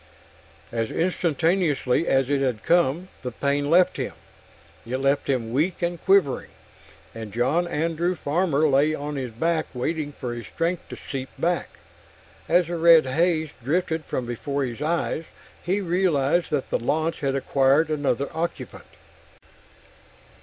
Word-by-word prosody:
As 115 -1 -1
instantaneously 165 -4 +1
as 135 -1 +3
it 140 0 +1
had 125 -5 -1
come, 175 +1 +2
the 125 - -3
pain 140 +3 0
left 180 +3 +4
him. - - -3 0.7
It 120 +3 -3
left 135 +2 0
him 120 -4 -1
weak 170 +7 0
and 170 0 -2
quivering, 190 -9 +3 0.6
and 110 -2 -7
John 130 - +1
Andrew 170 +2 -1
Farmer 155 -1 +1
lay 145 +2 +3
on 145 0 -5
his 130 -3 -4
back 160 +7 0
waiting 150 +4 -2
for 125 -4 -5
his 120 -1 -7
strength 170 +1 -2
to - - -6
seep 135 -1 -6
back. 175 +1 -1 0.7
As 175 +1 +4
the 170 +1 -4
red 165 -2 +7
haze 160 +3 +1
drifted 160 +3 0
from 130 - -3
before 140 +4 -3
his 120 +1 -6
eyes, 165 0 -1 0.4
he 190 +4 0
realized 175 -3 +1
that 145 -3 -2
the - - +1
launch 160 +7 -1
had 135 -1 -1
acquired 135 +3 +3
another 140 -3 0
occupant. 165 +1 -5
150 Hz, 145 wpm, -24 LUFS, 135-170 Hz, 0.7 s, red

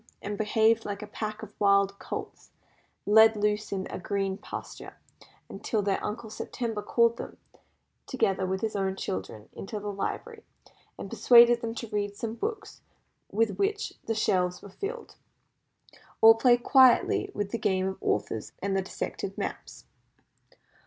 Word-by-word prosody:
and 205 +1 -5
behaved 220 +2 +2
like 205 0 -5
a 210 - -12
pack 215 0 -5
of 210 -1 -10
wild 200 -1 +3
colts - - -7 0.6
let 220 +1 +6
loose 210 +1 0
in 190 -1 -2
a - - -5
green 195 0 -2
pasture, 205 - -9 0.5
until 215 -3 -2
their 195 -1 -1
Uncle 220 +1 -5
September 225 -2 -4
called 235 +2 +2
them, - - -8 0.7
together 195 -7 0
with 190 +1 -2
his 220 -1 -2
own 190 -1 -1
children, 105 - -5
into 210 +2 -6
the 205 0 -4
library, 435 - -5 0.5
and - - -8
persuaded 240 -1 +6
them 230 0 -4
to 235 - -5
read 205 -1 -2
some 220 +2 -4
of 230 - -9
the - - -26
books 430 0 -5 0.5
with 220 +1 0
which 410 +1 -1
the 225 - 0
shelves 180 -4 +1
were 200 - -10
filled, 425 - -6 1.1
or 225 0 +9
play 240 +1 +4
quietly 260 0 +4
with 205 -1 -3
the 230 - -2
game 190 -2 +1
of 190 - -6
Authors 105 +1 -2
and 195 0 -2
the 195 - +2
Dissected 190 - -5
Maps. - - -6
210 Hz, 160 wpm, -28 LUFS, 195-230 Hz, 1.1 s, or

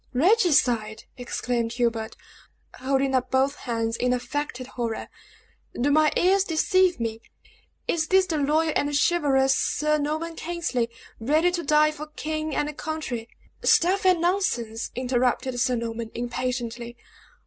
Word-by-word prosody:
"Regicide!" 255 - +2
exclaimed 245 -2 -2
Hubert, 235 -2 -1 0.6
holding 270 +1 0
up 255 -1 +1
both 265 +1 +2
hands 230 -3 -2
in 250 +1 +1
affected 255 +1 -3
horror. 235 -2 -4 0.7
"Do 280 +4 +2
my 305 +1 +4
ears 380 +2 +4
deceive 370 0 +2
me? 225 -1 -3 0.7
Is 315 -2 0
this 380 +2 +4
the 320 -4 -2
loyal 310 +2 +1
and 290 0 0
chivalrous 280 -5 +3
Sir 305 0 +1
Norman 315 +3 -3
Kingsley, 320 -9 -2 0.3
ready 310 +9 +2
to 350 -1 -2
die 305 0 +3
for 305 0 -8
king 310 0 -4
and 300 0 -1
country 290 -8 -5 0.2
" - - -41
"Stuff 370 +4 +3
and 370 -2 +4
nonsense!" 245 - -1
interrupted 250 0 0
Sir 250 0 +2
Norman, 230 -1 -4
impatiently. 240 -1 -4
275 Hz, 135 wpm, -25 LUFS, 240-315 Hz, 0.7 s, my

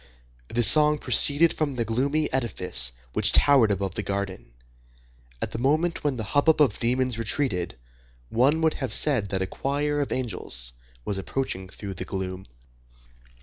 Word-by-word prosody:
This 120 -1 +4
song 150 0 +6
proceeded 150 +2 +4
from 145 -4 -3
the 120 -2 -2
gloomy 140 +7 -1
edifice 90 - 0 0.2
which - - +1
towered 135 -6 +4
above 100 -2 -2
the 110 - -4
garden. 100 -8 -5 0.9
At - - -4
the - - -6
moment 155 +7 0
when 145 -3 -1
the 110 - -4
hubbub 145 +8 +1
of 135 -8 +2
demons 125 0 -1
retreated, 110 - -2 0.5
one 140 +7 +1
would 160 -1 +2
have 130 -3 -2
said 125 -10 +3
that 95 -1 -2
a - - -2
choir 145 +8 -2
of 140 - -4
angels 75 - -1 0.3
was 100 -2 -3
approaching 95 -4 -5
through 100 +1 -8
the 90 - -6
gloom. 95 -1 -6
120 Hz, 155 wpm, -24 LUFS, 95-145 Hz, 0.9 s, song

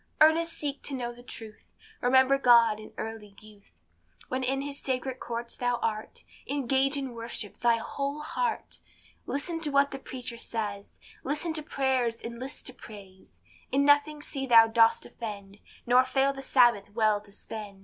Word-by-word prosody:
Earnest 325 +2 +5
seek 285 -2 -3
to 280 - -4
know 240 -2 -4
the 240 - -14
truth, 225 -3 -11 0.3
Remember 260 +2 +4
God 235 -4 +5
in 215 - -11
early 220 -2 -7
youth; 210 -1 -18 0.5
When 260 +1 -1
in 270 +2 0
his 280 0 -4
sacred 260 0 -3
courts 235 0 -5
thou 245 0 0
art, 215 -2 -4 0.2
Engage 275 0 +1
in 270 -3 -4
worship 230 -3 -4
thy 235 -1 +3
whole 280 +5 -4
heart; 470 +8 -3 0.5
Listen 330 +4 -3
to 305 - -2
what 280 0 +3
the 270 - -6
preacher 250 -3 -7
says, 205 -3 -4 0.3
Listen 300 +4 -2
to 315 - 0
prayers, 260 -5 0
and 235 0 -7
list 265 +2 -6
to 255 - -1
praise, 190 - -14 0.3
In 280 +1 +3
nothing 290 +1 +3
see 270 -2 -4
thou 230 -2 +8
dost 225 0 +3
offend, 205 -3 -8 0.3
Nor 250 +1 +5
fail 270 +2 +1
the 270 - -8
Sabbath 240 -6 +4
well 215 -2 +2
to 205 -1 -15
spend. 205 -1 -8
250 Hz, 170 wpm, -28 LUFS, 225-275 Hz, 0.5 s, thou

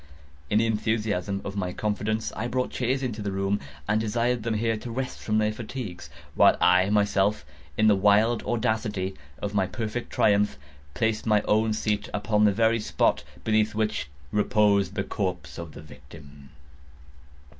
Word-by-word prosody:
In 105 - +2
the 115 - +3
enthusiasm 105 -3 -1
of 100 - -5
my 90 -3 -2
confidence, 110 +1 -2
I 115 - -2
brought 125 +1 -1
chairs 130 +2 -1
into 115 -4 -3
the 100 -1 -2
room, 95 +1 0 0.3
and 110 +1 +2
desired 120 +2 0
them 115 0 -1
here 115 +1 +1
to 120 - -8
rest 125 +2 -4
from 110 0 -1
their 110 0 +2
fatigues, 110 -5 -7 0.2
while - - +5
I 90 +2 +4
myself, 100 -3 +2 0.3
in 110 - +3
the 105 -1 +6
wild 105 +4 +3
audacity 110 -4 -1 0.3
of 100 0 -2
my 95 -2 +1
perfect 115 +2 -4
triumph, 105 -8 +2 0.4
placed 110 -1 0
my 105 -1 +3
own 110 +1 +2
seat 105 -1 -1
upon 105 0 +2
the 105 - +5
very 115 +3 +2
spot 105 - +1 0.2
beneath 110 -1 +1
which 105 -9 -1 0.2
reposed 105 -3 +2
the 95 - 0
corpse 90 -4 -4
of 85 -2 -7
the 75 - -10
victim. 70 -1 -14
105 Hz, 165 wpm, -26 LUFS, 100-110 Hz, 0.4 s, the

